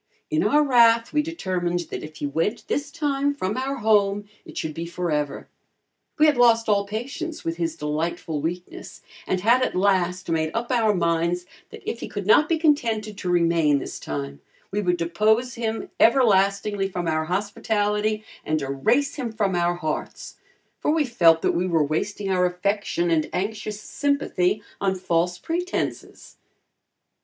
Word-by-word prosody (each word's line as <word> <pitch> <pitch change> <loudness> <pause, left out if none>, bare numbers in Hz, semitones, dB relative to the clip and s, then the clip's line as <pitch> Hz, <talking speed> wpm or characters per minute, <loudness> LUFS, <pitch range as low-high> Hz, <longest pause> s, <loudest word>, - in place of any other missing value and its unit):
In 315 +1 +2
our 300 +1 +4
wrath, 235 -4 +4
we 300 - +3
determined 185 - -2
that - - -4
if 155 0 -9
he 150 - -4
went 165 +11 -2
this 285 0 -1
time 285 -2 -1
from 195 -6 -2
our 265 +2 -2
home, 205 -3 +2 0.2
it - - -11
should 155 - -3
be 165 +2 -5
forever. 150 -5 -2 0.7
We 305 - +5
had 300 -3 +4
lost 230 -2 +4
all 200 -2 +2
patience 275 +10 -5
with 165 0 -2
his 165 -2 -2
delightful 155 0 -3
weakness 175 +3 -6 0.2
and 185 - 0
had 235 +5 +4
at - - 0
last 185 -1 +1
made 160 -1 0
up 235 +2 -2
our 225 -4 +3
minds 170 +1 0 0.2
that - - -12
if 235 - -3
he - - -5
could 205 -2 -5
not 295 +9 +5
be 330 - +2
contented 230 -9 +1
to 180 - -3
remain 165 -4 +3
this 135 - -6
time, 70 -1 -5 0.3
we 205 +1 0
would 180 -3 +1
depose 215 +9 +1
him 225 -1 -3
everlastingly 200 -4 +3
from 180 -2 -3
our 155 0 0
hospitality 210 +2 -1 0.2
and 155 +1 0
erase 220 - +1
him 245 -5 -3
from 210 -3 0
our 175 0 +1
hearts, 155 -3 -5 0.4
for - - -1
we 310 -1 +2
felt 170 -10 +4
that - - +3
we 180 +2 0
were 165 -4 +2
wasting 195 +7 -2
our 180 -1 +3
affection 180 -1 -1
and 155 -2 +1
anxious 210 +2 -3
sympathy 215 -7 0 0.2
on 195 -1 +1
false 175 -1 0
pretenses. 350 - -4
200 Hz, 165 wpm, -24 LUFS, 170-235 Hz, 0.7 s, We